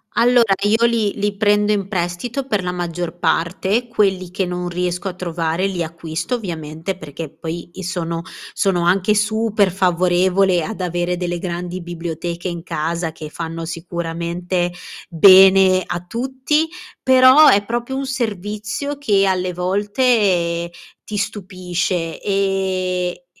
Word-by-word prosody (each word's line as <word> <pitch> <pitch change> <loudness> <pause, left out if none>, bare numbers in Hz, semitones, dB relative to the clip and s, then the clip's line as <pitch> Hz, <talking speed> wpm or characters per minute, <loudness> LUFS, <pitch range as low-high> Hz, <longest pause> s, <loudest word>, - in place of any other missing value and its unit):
Allora, 235 -3 +4
io 220 +3 +3
li 225 -3 +1
li 205 0 -1
prendo 205 0 +3
in 200 -2 0
prestito 195 +8 -3
per 210 -8 -1
la 180 - -2
maggior 175 -1 -4
parte, 190 +7 0
quelli 190 -5 0
che 185 +1 -2
non 180 0 -3
riesco 180 +1 -2
a 185 - -3
trovare 170 0 -2
li 180 -3 -2
acquisto 165 +6 -4
ovviamente, 165 -3 -5
perché 155 -1 -7
poi 165 +2 -7
i 190 - -7
sono 170 -2 -3 0.3
sono 190 -4 +1
anche 190 +4 +3
super 215 -2 +1
favorevole 180 0 +2
ad 205 +2 -6
avere 175 0 -1
delle 175 -1 -3
grandi 175 +1 -4
biblioteche 170 +1 -5
in 170 -1 -5
casa 165 0 -2
che 155 -1 -8
fanno 165 +1 -5
sicuramente 170 +1 -3 0.4
bene 190 +1 +7
a 175 - -4
tutti, 265 - -1 0.3
però 260 +3 +7
è 200 0 +5
proprio 240 +4 -3
un 270 0 -2
servizio 215 +2 -3
che 205 -8 +2
alle 185 -2 0
volte 185 -3 +1 0.3
ti 215 - -6
stupisce 185 -4 -3
ehm, 190 -2 0
e 180 - -19
185 Hz, 135 wpm, -19 LUFS, 175-205 Hz, 0.4 s, bene